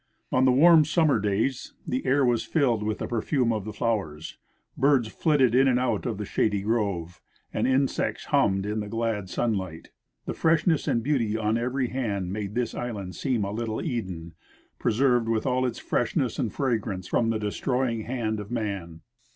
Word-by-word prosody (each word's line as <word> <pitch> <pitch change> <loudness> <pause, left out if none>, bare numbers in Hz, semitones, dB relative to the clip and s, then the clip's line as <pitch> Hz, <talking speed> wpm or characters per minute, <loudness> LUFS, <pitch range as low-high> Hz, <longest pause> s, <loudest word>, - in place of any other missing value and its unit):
On 130 +1 +3
the 130 - +5
Avarm 160 +4 +7
summer 155 -4 +2
days 105 +6 -1
the 130 - -1
air 135 +1 +3
Avas 120 -2 +2
filled 130 -9 +1
Avith 105 0 -1
the - - -4
perfume 120 +1 0
of 105 -3 -3
the 110 - -4
floAvers, 100 -9 -3 0.4
birds 135 -4 +3
flitted 135 -3 +2
in 135 +2 +5
and 125 -1 +3
out 120 -3 0
of 115 -4 -2
the 105 - -4
shady 100 0 0
grove, 100 -6 -1 0.3
and - - 0
insects 130 +1 0
hummed 95 -1 +2
in 105 +1 -2
the 105 -1 -5
glad 115 -4 -2
sunlight; 95 -7 -2 0.3
the - - -3
freshness 160 -1 +2
and 115 - +1
beauty 115 -6 0
on 110 -1 0
eA^ery 125 +2 -1
hand 100 -8 -2
made 105 0 -4
this 120 -1 -1
island 100 -7 -5
seem 125 -2 0
a 100 - -3
little 110 0 -3
Eden, 95 - -4 0.5
preserved 120 0 +2
Avith 115 -1 0
all 130 -1 +1
its 120 - -4
freshness 125 +2 -1
and 120 -6 -1
fragrance 110 -8 -2
from 115 - +1
the 115 - +1
destroying 115 +3 -1
hand 115 -3 -2
of 105 -1 -7
man. 100 -8 -4
115 Hz, 180 wpm, -26 LUFS, 105-130 Hz, 0.5 s, Avarm